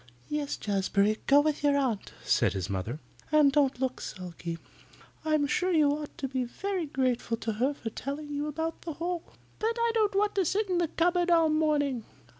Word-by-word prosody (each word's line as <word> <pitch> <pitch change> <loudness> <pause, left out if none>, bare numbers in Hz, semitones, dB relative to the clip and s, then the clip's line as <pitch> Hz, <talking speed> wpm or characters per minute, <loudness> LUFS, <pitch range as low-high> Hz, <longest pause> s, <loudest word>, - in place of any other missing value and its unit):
"Yes, 295 -1 -2
Jazbury. 200 +1 +1
Go 285 +1 +7
with 300 0 0
your 285 -1 +4
aunt," 250 -7 -1
said - - +2
his 95 0 -3
mother. 100 +9 -3 0.3
"And 300 -2 +6
don't 275 -2 +2
look 260 -1 -1
sulky. 170 -2 -6 0.7
I'm 310 -2 +2
sure 360 +6 +1
you 305 -4 +4
ought 300 +1 -5
to 285 -5 -2
be 260 -1 -1
very 365 +7 -3
grateful 255 -4 0
to 225 0 -2
her 280 +3 +2
for 225 -5 -6
telling 290 +5 -5
you 290 +1 -2
about 320 +2 -3
the 330 - -5
hole." 340 +2 -2 0.4
"But 455 +2 0
I 465 0 +3
don't 425 -3 +2
want 415 +1 +2
to 390 - +2
sit 390 +3 0
in 355 - +2
the 345 - +2
cupboard 350 +2 +1
all 330 -2 +5
morning. 295 -5 +1
290 Hz, 195 wpm, -29 LUFS, 255-335 Hz, 0.7 s, Go